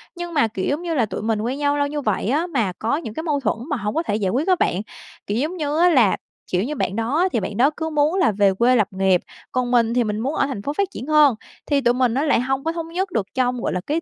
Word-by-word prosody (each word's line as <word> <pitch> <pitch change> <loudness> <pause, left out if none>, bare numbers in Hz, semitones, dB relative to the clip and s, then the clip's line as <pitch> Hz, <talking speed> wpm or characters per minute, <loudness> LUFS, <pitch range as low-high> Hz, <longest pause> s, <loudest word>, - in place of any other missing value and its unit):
Nhưng 345 0 -6
mà, 290 -7 +3
kiểu, 195 -4 -4
giống 295 +4 -1
như 340 -2 -3
là, 240 - +2
tụi 210 - -5
mình 220 -1 0
quen 250 +5 -2
nhau 290 0 +1
lâu 285 - +1
như 295 0 -3
vậy 215 -4 -1
á, 310 +7 +1
mà 235 - -1
có 230 +6 0
những 225 -10 -6
cái 320 - -5
mâu 295 -4 0
thuẫn 265 - -1
mà 285 - 0
hổng 210 +3 -3
có 325 - +1
thể 205 - -1
giải 205 -3 0
quyết 275 - 0
á 370 - +5
bạn, 180 +4 +1 0.5
kiểu, 205 - -1
giống 320 +6 -2
như 300 -1 -1
á 355 +1 +6
là, 245 - +4 0.3
kiểu 180 +2 +1
như, 300 +5 -3
bạn 200 -7 -2
đó 280 +11 +1
thì 230 - +2
bạn 205 0 -5
đó 265 +4 +5
cứ 320 -1 -2
muốn 300 +2 +1
là 365 - +3
về 200 -1 +3
quê 240 +5 +3
lập 215 -5 +3
nghiệp, 190 -2 +2 0.3
còn 250 -1 -1
mình 235 -2 +3
thì 245 -1 +2
mình 210 -1 -2
muốn 270 +7 -2
ở 280 - +1
thành 260 -8 -5
phố 285 +8 -3
phát 400 +4 0
triển 260 - -7
hơn, 300 -5 +5 0.3
thì 285 -2 +1
tụi 240 -1 +3
mình 250 -2 +1
nó 275 +4 0
lại 290 -6 +3
hông 265 +2 -1
có 325 - 0
thống 330 -1 -5
nhất 365 +3 -2
được 220 - 0
trong, 250 -1 0
gọi - - -1
là, 180 - -2
cái 315 +3 0
260 Hz, 310 wpm, -22 LUFS, 220-305 Hz, 0.5 s, á